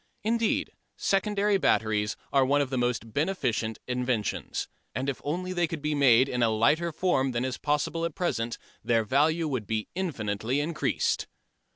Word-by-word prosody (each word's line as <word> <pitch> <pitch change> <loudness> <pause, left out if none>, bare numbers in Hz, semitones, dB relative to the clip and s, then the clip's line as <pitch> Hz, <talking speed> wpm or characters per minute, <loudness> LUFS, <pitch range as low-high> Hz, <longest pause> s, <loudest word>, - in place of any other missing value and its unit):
Indeed 230 +1 +1 0.3
secondary 200 0 +1
batteries 110 - +1 0.2
are 135 -1 +5
one 140 +2 +3
of 140 -2 -1
the 130 - 0
most 120 -2 -1
beneficent 130 - -1
inventions. 125 -4 -2 0.3
And 130 +2 -2
if 140 - -2
only 180 +5 -2
they 175 -2 +1
could 160 -2 -6
be 150 0 0
made 130 -3 +5
in 125 -2 -2
a 115 - +4
lighter 150 +11 +2
form 140 -6 +1
than 120 +2 0
is 130 -2 -3
possible 150 +3 0
at 170 -3 -2
present 120 -10 -1 0.3
their 115 -1 +2
value 155 +8 +2
would 125 -8 -3
be 110 -1 -2
infinitely 125 - -2
increased. 155 +2 0
135 Hz, 165 wpm, -28 LUFS, 115-165 Hz, 0.3 s, are